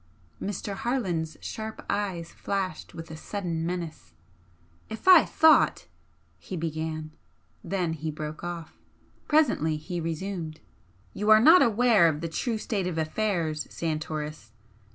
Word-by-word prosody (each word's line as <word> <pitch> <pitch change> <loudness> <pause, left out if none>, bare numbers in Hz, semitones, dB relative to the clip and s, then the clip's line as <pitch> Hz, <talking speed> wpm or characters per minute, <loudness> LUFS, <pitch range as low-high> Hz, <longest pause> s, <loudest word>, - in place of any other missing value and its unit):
Mr. 200 0 -3
Harland's 180 - -2
sharp 220 0 -6
eyes 190 -5 -2
flashed 195 -2 -4
with 165 0 -8
a - - -6
sudden 170 -1 -4
menace. 170 - -5 0.8
"If 220 +10 -8
I 365 -4 +9
thought 320 0 +4 0.3
" - - -39
he 185 - -6
began 155 -1 -3 0.5
then 180 -4 -1
he 160 0 -4
broke 155 +1 -6
off. 170 -2 -6 0.5
Presently 235 - +3
he 175 +3 -5
resumed 165 -1 -4 0.5
"You 210 +1 -2
are 215 0 +9
not 320 +10 +8
aware 225 -5 +5
of 155 -2 -1
the 165 - -3
true 225 - -2
state 205 -4 -2
of 175 -3 -3
affairs, 160 -2 -1
Santoris. 155 -6 -4
170 Hz, 135 wpm, -27 LUFS, 160-210 Hz, 0.8 s, I